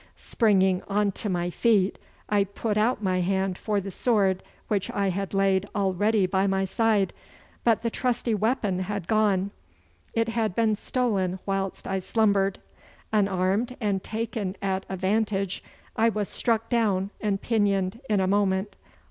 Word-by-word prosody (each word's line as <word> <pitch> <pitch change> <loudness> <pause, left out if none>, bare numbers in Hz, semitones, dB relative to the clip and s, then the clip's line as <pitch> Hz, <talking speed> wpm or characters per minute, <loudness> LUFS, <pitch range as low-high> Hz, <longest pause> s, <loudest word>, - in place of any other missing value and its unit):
Springing 190 -5 +2
on 205 0 +1
to 210 - -4
my 175 -1 -1
feet 205 -2 +2 0.3
I 205 -1 +3
put 205 +2 -3
out 215 +1 +1
my 185 -1 +1
hand 190 +1 0
for 210 +2 -1
the 195 0 -6
sword 195 -3 +1 0.3
which 200 -3 -1
I 200 -1 0
had 195 +1 -3
laid 195 0 +2
all 195 -2 +1
ready 205 +2 +2
by 190 +1 +1
my 195 0 +1
side, 210 0 +1 0.5
but 230 -1 +3
the 230 - 0
trusty 245 -2 0
weapon 210 -3 0
had 195 -1 -3
gone. 200 -3 +2 0.6
It 230 0 +1
had 225 -4 -1
been 220 -2 +2
stolen 200 -6 -1
whilst 195 -1 -2
I 190 0 -1
slumbered. 200 -1 +1 0.6
Unarmed 200 +4 +1
and 200 -4 -1
taken 220 -3 -3
at 190 -1 -2
a 190 - -3
vantage, 195 0 0 0.3
I 225 +1 +4
was 210 -2 -2
struck 225 -1 0
down 205 -5 +1
and 205 -2 0
pinioned 200 -2 0
in 210 -2 +3
a 190 - +2
moment. 195 0 +1
200 Hz, 155 wpm, -26 LUFS, 190-220 Hz, 0.6 s, I